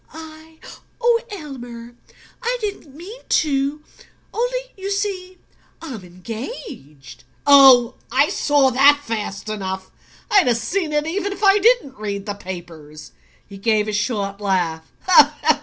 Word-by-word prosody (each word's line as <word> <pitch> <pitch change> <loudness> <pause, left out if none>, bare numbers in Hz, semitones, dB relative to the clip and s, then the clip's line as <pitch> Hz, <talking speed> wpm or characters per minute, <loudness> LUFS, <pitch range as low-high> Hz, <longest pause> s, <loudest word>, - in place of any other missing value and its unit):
"I 320 0 -12 0.4
oh, 475 -1 +2
Elmer! 245 - -9 0.5
I 485 +2 -1
didn't 400 - -6
mean 400 +10 -10
to; 285 0 0 0.5
only, - - -1 0.2
you 390 0 -6
see, 390 -2 -3 0.4
I'm 260 - -8
engaged." 180 - -9 0.2
"Oh, 265 -4 +7 0.2
I - - +3
saw 285 -3 +2
that 280 +3 +5
fast 215 -4 -5
enough. 190 -3 -5 0.4
I'd 400 -7 +5
have 240 -2 +3
seen 310 - -2
it 300 0 0
even 395 +5 -2
if 405 - -10
I 395 +1 +5
didn't 420 - +2
read 200 -2 -4
the 205 - -3
papers." 165 -6 -10 0.3
He 200 -1 -12
gave 215 0 +1
a 215 - -3
short 205 -2 -2
laugh. 175 -5 -1
265 Hz, 130 wpm, -20 LUFS, -, 0.5 s, Oh